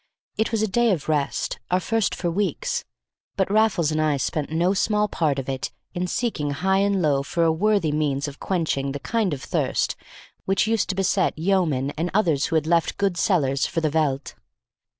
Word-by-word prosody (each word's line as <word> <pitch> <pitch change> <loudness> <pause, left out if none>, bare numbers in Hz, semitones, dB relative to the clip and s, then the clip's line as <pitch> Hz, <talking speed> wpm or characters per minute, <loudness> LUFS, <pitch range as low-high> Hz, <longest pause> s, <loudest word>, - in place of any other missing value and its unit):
It 220 +1 0
was 220 -2 +1
a - - +2
day 235 +4 +2
of 175 -9 -1
rest, 150 -3 -1
our 180 - +2
first 225 +2 0
for 175 -1 -2
weeks, 485 - -1 0.5
but 190 -1 0
Raffles 205 -7 +3
and 155 0 0
I 150 -2 +2
spent 145 +2 -2
no 175 +4 +2
small 210 +1 +1
part 155 -8 0
of 135 - -4
it 135 -1 -3 0.2
in 180 0 -2
seeking 180 -9 -1
high 190 +7 +1
and 200 -2 +1
low 140 -3 +2
for 165 +4 -1
a 165 - +4
worthy 195 -1 +1
means 145 -2 0
of 140 -1 -9
quenching 155 -7 -1
the 140 - -4
kind 220 +2 0
of 140 -3 -4
thirst - - 0 0.5
which 195 +2 +2
used 220 -2 0
to 190 - -1
beset 190 -1 +1
Yeomen 160 -6 +1
and 170 +2 0
others 165 -9 +2
who 165 - -2
had 155 -1 +2
left 170 0 +1
good 200 -3 +1
cellars 145 -8 +1
for 170 - -2
the 155 -2 0
veldt. 145 -3 0
170 Hz, 200 wpm, -24 LUFS, 150-200 Hz, 0.5 s, a